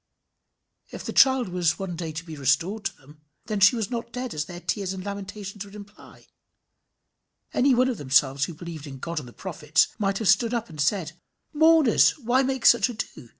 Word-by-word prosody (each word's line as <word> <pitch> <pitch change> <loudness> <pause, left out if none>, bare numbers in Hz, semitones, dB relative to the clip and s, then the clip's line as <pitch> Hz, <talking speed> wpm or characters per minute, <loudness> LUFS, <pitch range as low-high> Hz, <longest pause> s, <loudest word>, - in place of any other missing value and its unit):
If - - -8
the - - -4
child 260 -5 +4
was 180 -2 +1
to - - -14
be - - -23
one 190 -3 -4
day 165 -1 -5
restored 165 +7 -1
to 195 - -3
them, 145 +2 -19 0.2
then 215 -2 -2
she 200 +4 +6
was 225 0 -3
not 235 -1 -4
dead 250 0 -5
as 150 -1 -3
their 175 +2 -9
tears 195 +1 -3
and 185 0 -7
lamentations 200 0 -6
would 200 0 -14
imply. 205 0 -14 1.3
Any 260 0 +3
one 255 +2 +3
of 250 -4 -3
themselves 135 0 +2
who 170 - -8
believed 160 -2 -8
in 135 -1 -8
God 165 +4 -4
and 135 - -10
the - - -12
prophets, 155 -2 0
might 195 -1 0
have 220 - -2
stood 225 +6 +3
up 235 -1 -3
and 155 -2 -6
said 160 +2 0 0.4
"Mourners, 315 -5 +5
why 255 -1 +1
make 265 -2 -2
such 235 0 +6
ado? 215 - -7
195 Hz, 200 wpm, -25 LUFS, 160-235 Hz, 1.3 s, she